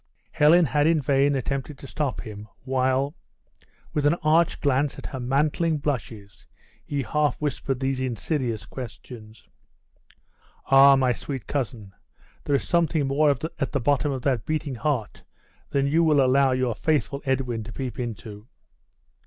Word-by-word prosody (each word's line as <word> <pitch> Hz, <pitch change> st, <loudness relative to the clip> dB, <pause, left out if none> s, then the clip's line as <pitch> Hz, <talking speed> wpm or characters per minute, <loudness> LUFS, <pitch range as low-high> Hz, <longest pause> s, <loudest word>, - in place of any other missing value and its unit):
Helen 160 Hz, +3 st, +5 dB
had 150 Hz, 0 st, +2 dB
in 165 Hz, -1 st, +3 dB
vain 140 Hz, +1 st, +2 dB
attempted 135 Hz, +2 st, -3 dB
to 140 Hz, -, -12 dB
stop 140 Hz, 0 st, -3 dB
him, 105 Hz, -2 st, -9 dB, 0.2 s
while, 130 Hz, +2 st, 0 dB, 0.8 s
with 145 Hz, -1 st, +2 dB
an 155 Hz, -, +3 dB
arch 160 Hz, +2 st, +3 dB
glance 140 Hz, 0 st, +1 dB
at -, -, -10 dB
her 130 Hz, -, -5 dB
mantling 150 Hz, +5 st, +1 dB
blushes, 115 Hz, -9 st, -5 dB, 0.4 s
he 140 Hz, -2 st, -3 dB
half 150 Hz, +3 st, 0 dB
whispered 135 Hz, -3 st, -2 dB
these 135 Hz, -1 st, -1 dB
insidious 125 Hz, -, -2 dB
questions. 115 Hz, -3 st, -10 dB, 1.2 s
"Ah, 135 Hz, 0 st, +7 dB
my 130 Hz, -2 st, +2 dB
sweet 135 Hz, 0 st, -6 dB
cousin, 120 Hz, -8 st, -4 dB, 0.5 s
there 145 Hz, -, +2 dB
is 135 Hz, -, -1 dB
something 165 Hz, -3 st, +1 dB
more 145 Hz, +3 st, +2 dB
at 145 Hz, +1 st, -2 dB
the 140 Hz, -, +1 dB
bottom 145 Hz, +3 st, +1 dB
of 130 Hz, -3 st, -4 dB
that 130 Hz, -6 st, 0 dB
beating 155 Hz, -1 st, -2 dB
heart 125 Hz, -4 st, -2 dB, 0.5 s
than 140 Hz, -1 st, +1 dB
you 160 Hz, +4 st, +2 dB
will 155 Hz, -3 st, +4 dB
allow 135 Hz, 0 st, +4 dB
your 130 Hz, -2 st, 0 dB
faithful 140 Hz, +1 st, -1 dB
Edwin 130 Hz, -4 st, -1 dB
to 115 Hz, -, -8 dB
peep 130 Hz, +1 st, -5 dB
into." 110 Hz, -2 st, -6 dB
135 Hz, 150 wpm, -25 LUFS, 125-145 Hz, 1.2 s, Ah